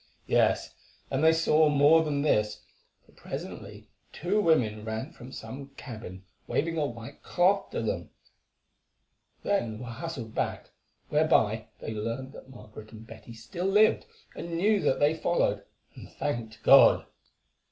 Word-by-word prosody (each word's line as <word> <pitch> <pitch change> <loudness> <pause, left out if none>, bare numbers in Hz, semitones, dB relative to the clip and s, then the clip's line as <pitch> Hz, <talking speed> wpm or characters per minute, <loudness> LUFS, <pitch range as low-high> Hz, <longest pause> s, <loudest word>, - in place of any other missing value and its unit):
Yes, - - +1 0.4
and 135 +2 0
they 160 - +7
saw 160 -1 +3
more 150 +3 +5
than 145 -2 -1
this, 105 -7 0 0.4
for - - -24
presently - - -8 0.2
two 195 +6 0
women 115 - +2
ran 110 +6 -5
from 125 +2 -12
some 130 +4 -8
cabin 110 -7 -9 0.2
waving 165 +2 -1
a 150 -3 0
white 115 -2 -10
cloth 190 +3 +1
to - - -3
them; - - -3 1.3
then 120 - -1
were 125 - -8
hustled 120 -2 -6
back, - - -3 0.4
whereby 110 -8 +2
they 110 - -6
learned 115 +5 -4
that 130 - -13
Margaret 110 -4 -12
and 110 0 -12
Betty 115 +1 -12
still 120 +11 -5
lived 210 +2 +3 0.3
and 170 -1 -5
knew 205 +4 +3
that - - +1
they 145 +2 +3
followed, 170 +2 0 0.3
and - - -12
thanked 115 -5 -4
God. - - +7
130 Hz, 140 wpm, -28 LUFS, 110-160 Hz, 1.3 s, they